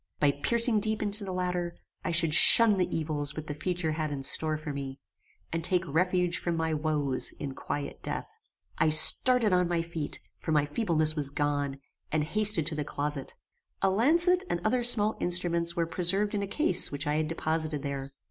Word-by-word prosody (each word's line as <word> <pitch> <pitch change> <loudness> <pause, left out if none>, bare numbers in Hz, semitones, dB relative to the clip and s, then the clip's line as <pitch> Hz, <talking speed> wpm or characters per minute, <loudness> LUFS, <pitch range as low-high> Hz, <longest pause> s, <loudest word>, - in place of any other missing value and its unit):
By 145 -1 +2
piercing 230 - +3
deep 215 +1 -2
into 205 0 0
the 190 - -6
latter, 180 -1 -4 0.3
I - - -4
should 165 -2 +2
shun 220 +4 +8
the 180 - 0
evils 150 -2 -3
which 155 - -7
the 150 - -6
future 175 +1 -3
had 155 0 -4
in 140 -2 -6
store 155 +3 -1
for 150 -1 -7
me, 135 -1 -8 0.5
and 165 0 -3
take 180 +1 0
refuge 180 +2 -1
from 170 -1 -4
my 160 0 -2
woes 150 -4 -1
in 140 -2 -8
quiet 145 +2 -7
death. - - -6 0.5
I 155 0 +2
started 220 +8 +5
on 180 -1 +1
my 170 -1 -2
feet, 165 -3 -7 0.2
for - - -6
my 150 -2 +1
feebleness 155 -2 0
was 145 -3 -1
gone, 145 -1 -3 0.3
and 155 -1 -1
hasted 210 -1 +1
to 160 0 +1
the 150 - -3
closet. 145 -1 -5 0.5
A 190 - +2
lancet 335 - +2
and 175 - -2
other 245 +3 0
small 220 -3 +5
instruments 170 -1 +1
were 170 -2 -1
preserved 195 +5 0
in 205 - -2
a 200 - -4
case 310 - +2
which 145 +1 -4
I 150 +1 -1
had 155 0 -2
deposited 155 -2 -4
here. 140 -1 -6
165 Hz, 195 wpm, -27 LUFS, 150-190 Hz, 0.5 s, shun